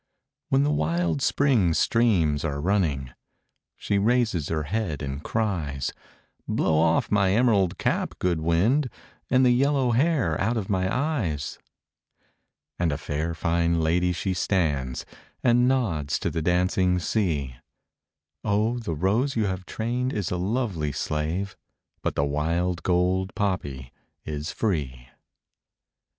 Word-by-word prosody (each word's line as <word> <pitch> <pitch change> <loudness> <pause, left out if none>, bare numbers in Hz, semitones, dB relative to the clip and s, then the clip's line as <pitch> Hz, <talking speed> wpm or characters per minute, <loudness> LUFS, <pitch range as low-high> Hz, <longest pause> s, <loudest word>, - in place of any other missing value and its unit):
When 70 - +3
the 75 - +2
wild 80 +1 0
spring 115 - +2
streams 85 -9 +2
are 70 -3 -2
running, 75 -8 0 0.7
She 100 - 0
raises 110 - +1
her 80 -2 -1
head 80 -3 -2
and 70 +2 -4
cries, 80 - -2 0.5
"Blow 80 -1 +1
off 80 0 +2
my 100 -2 +3
emerald 105 -7 +3
cap, - - -1
good 85 -3 0
wind, 105 - +2 0.4
And 130 +1 +4
the 125 - +5
yellow 135 0 +2
hair 125 - +1
out 115 +5 +1
of 100 -2 -3
my 95 -1 +1
eyes!" 120 - -2 1.2
And 85 -3 +1
a 70 - -1
fair 80 +3 -3
fine 85 0 +1
lady 90 +3 +2
she 95 +2 -2
stands, 75 -9 -1 0.4
And 120 0 +4
nods 85 - 0
to - - -2
the 80 - -2
dancing 90 +2 +2
sea, 80 - -1 0.9
O 110 +4 +1
the 105 -9 -3
rose 110 - +1
you 110 -2 +1
have 95 -2 -3
trained 125 +3 -2
is 100 -5 -2
a 90 - 0
lovely 95 - -1
slave, 80 +8 -2 0.5
But - - -2
the 70 - +1
wild 85 +5 -1
gold 90 +1 +1
poppy 70 - -2 0.3
is 75 +1 -4
free! 65 - -2
90 Hz, 135 wpm, -25 LUFS, 75-110 Hz, 1.2 s, the